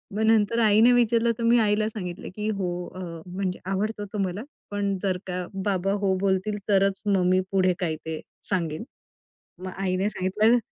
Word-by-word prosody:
मग 215 - -1
नंतर, 220 0 +3
आईने 220 +3 +6
विचारलं 235 -1 +3
तर, 235 - -4
मी 235 +1 +5
आईला 215 -1 +2
सांगितलं, 180 -5 -6
की 210 0 -2
"हो 195 -4 -1 0.3
अ, - - -7 0.3
म्हणजे 185 0 -3
आवडतो 205 +2 -1
तो - - -3
मला, 185 +3 -5 0.3
पण 200 -1 -1
जर 190 -2 +1
का 180 -1 -3 0.2
बाबा 195 -1 +1
हो 190 -1 +3
बोलतील, 195 +2 +1
तरच 195 -1 +3
मग 195 -3 +2
मी 185 0 +4
पुढे 185 -1 +3
काय 165 -4 -1
ते 160 -1 -4 0.3
सांगेल." 165 -4 -1 0.8
मग 185 - -4
आईने 190 +1 0
सांगितलं. 215 +5 +2
195 Hz, 175 wpm, -26 LUFS, 185-215 Hz, 0.8 s, आईने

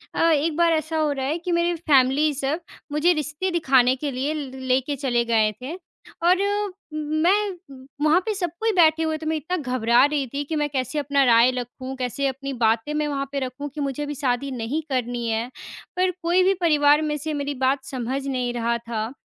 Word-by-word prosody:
अ, 330 - +3
एक 310 +1 +1
बार 340 -1 +4
ऐसा 315 0 -1
हो 305 -2 +1
रहा 270 -2 -2
है 300 +5 -1
कि 350 +1 -4
मेरी 345 0 +1
फैमिली 295 -2 +3
सब 280 +4 -2 0.3
मुझे 305 +4 +3
रिश्ते 305 +4 -2
दिखाने 265 -7 +3
के 285 +2 -4
लिए 270 +4 -2
ल 295 -3 -4 0.2
लेके 260 +3 +1
चले 250 -3 0
गए 220 -2 +2
थे 275 +7 -5 0.5
और 360 +2 +5
म 410 0 -1 0.5
मैं 395 +1 +2 0.5
वहाँ 310 +3 +5
पे 435 - 0
सब 360 -3 -1
कोई 450 0 +1
बैठे 325 -3 +4
हुए 315 -1 -1
थे। 315 - -9
मैं 320 +1 0
इतना 320 +4 -3
घबरा 250 -5 +2
रही 290 -2 -1
थी 285 +1 -2
कि 320 - -1
मैं 295 -1 +1
कैसे 260 +1 -2
अपना 280 -1 +2
राय 235 +1 +5
रखूँ, 255 +1 -6
कैसे 260 +2 -2
अपनी 275 +1 -4
बातें 230 +3 +1
मैं 300 0 0
वहाँ 280 -1 -2
पे 280 - -2
रखूँ 260 +2 -5
कि 300 - -3
मुझे 280 +1 -2
अभी 295 0 -4
शादी 270 0 -1
नहीं 255 +5 -2
करनी 245 -2 -2
है। 225 +1 -1 0.5
पर 370 0 +2
कोई 345 +2 +3
भी 380 +1 +4
परिवार 295 -3 +4
में 305 -1 -1
से 310 +2 -4
मेरी 285 0 -2
बात 265 +1 +1
समझ 265 +1 -3
नहीं 250 -3 -1
रहा 235 0 0
था, 230 0 -4
285 Hz, 210 wpm, -23 LUFS, 255-315 Hz, 0.5 s, और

